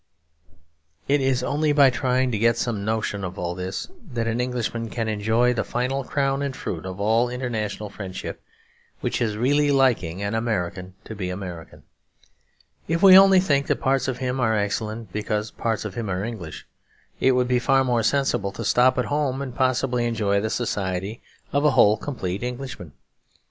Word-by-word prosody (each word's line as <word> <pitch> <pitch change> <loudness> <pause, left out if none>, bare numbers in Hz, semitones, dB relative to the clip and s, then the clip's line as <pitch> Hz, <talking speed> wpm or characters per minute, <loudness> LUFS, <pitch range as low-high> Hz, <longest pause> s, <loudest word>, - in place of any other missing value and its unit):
It 145 0 +3
is 130 -2 +1
only 150 +2 +1
by 140 -2 +6
trying 125 +1 +1
to 110 - -1
get 115 +1 +3
some 115 -4 -2
notion 110 -2 -2
of 90 0 -5
all 85 0 -2
this 90 +1 -5 0.3
that 115 -1 -1
an 115 +1 0
Englishman 120 -2 -2
can 115 -1 -3
enjoy 110 +3 +2
the 120 - -1
final 130 +3 -2
crown 135 +1 0
and 140 -2 -3
fruit 90 -5 -5
of 95 +1 -7
all 115 +4 +2
international 110 -5 -4
friendship; 95 -2 -7 0.6
which - - -2
is 110 -3 0
really 145 +5 +2
liking 120 -10 +2
an 100 +1 -2
American 95 -5 -2
to - - -8
be 95 -4 -4
American. 90 -3 -7 1.0
If 165 +4 0
we 190 -1 +10
only 195 0 +8
think 140 -7 +1
that - - 0
parts 135 -1 +1
of 130 -2 -2
him 130 0 -2
are 110 -3 +2
excellent 105 0 -3
because 105 0 -2
parts 110 -2 -2
of 105 - -5
him 115 -2 -4
are 90 +1 -2
English, 105 -9 -7 0.5
it 130 - +4
would 125 0 +2
be 125 0 +2
far 135 +1 +3
more 120 -3 +1
sensible 115 -5 +1
to - - -6
stop 130 +1 +4
at 125 - +1
home 145 -3 -1
and 135 -3 -5
possibly 130 -1 +1
enjoy 100 -3 +1
the 110 - -1
society 100 -2 -2 0.3
of 145 +1 +2
a 150 - +5
whole 105 +1 +6
complete 100 -7 -4
Englishman. 125 - -6
115 Hz, 180 wpm, -24 LUFS, 105-130 Hz, 1.0 s, we